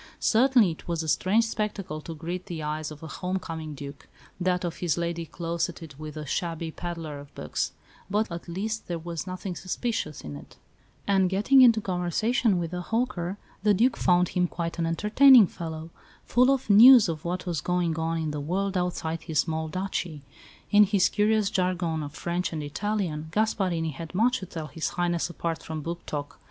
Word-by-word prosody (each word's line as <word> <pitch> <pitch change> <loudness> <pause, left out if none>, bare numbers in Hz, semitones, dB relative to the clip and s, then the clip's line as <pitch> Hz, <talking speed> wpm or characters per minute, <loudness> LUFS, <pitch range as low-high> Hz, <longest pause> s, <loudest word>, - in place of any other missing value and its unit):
Certainly 240 -4 +4
it 160 - -11
was 170 -1 -1
a - - -5
strange 195 +8 +3
spectacle 205 -7 -3
to 165 +1 -7
greet 175 +4 -5
the 165 -3 -5
eyes 155 +1 -3
of 155 0 -11
a - - -6
home 185 +4 -3
coming 160 -4 -6
Duke 140 0 -9 0.3
that 180 0 0
of 170 - -4
his 175 -3 0
lady 170 -1 -2
closeted 165 -1 -4
with 155 0 -7
a 155 - -5
shabby 165 +2 -3
pedlar 165 -4 -6
of 140 0 -14
books; 75 +1 -3 0.4
but 210 0 0
at 170 +1 -6
least 215 +6 -3
there 175 - -2
was 170 +1 -5
nothing 185 0 -5
suspicious 185 - -3
in 75 -1 -7
it, 70 - -12 0.5
and, 190 -2 +3
getting 210 +8 +5
into 230 -3 +7
conversation 195 +4 +1
with 170 -1 -3
the 180 0 -3
"hawker," 205 -4 -2 0.2
the 210 0 +4
Duke 235 +4 +3
found 180 -1 +3
him 180 -1 +1
quite 170 0 -4
an 165 - +1
entertaining 215 +8 +6
fellow, 160 -2 -7 0.3
full 250 +2 +4
of 275 -1 +1
news 230 +2 +9
of 160 -2 -4
what 180 +1 -3
was 170 -6 -2
going 180 -2 0
on 165 +1 -1
in 160 -2 -2
the 150 -1 -4
world 190 +6 -1
outside 170 -2 -2
his 160 -3 -4
small 160 +1 0
duchy. 175 -3 -4 0.5
In 210 0 +8
his 195 -2 +3
curious 210 -1 +2
jargon 180 -4 0
of 145 -1 -6
French 175 +1 -2
and 155 -2 -4
Italian, 160 -1 -2
Gasparini 180 -4 0
had 165 +4 -8
much 245 +5 +3
to 185 - -8
tell 165 -3 -6
His 160 +1 -3
Highness 175 -1 0
apart 170 -1 -3
from 160 -1 -5
book 170 +2 -5
talk. 145 -1 -5
175 Hz, 190 wpm, -27 LUFS, 160-200 Hz, 0.5 s, news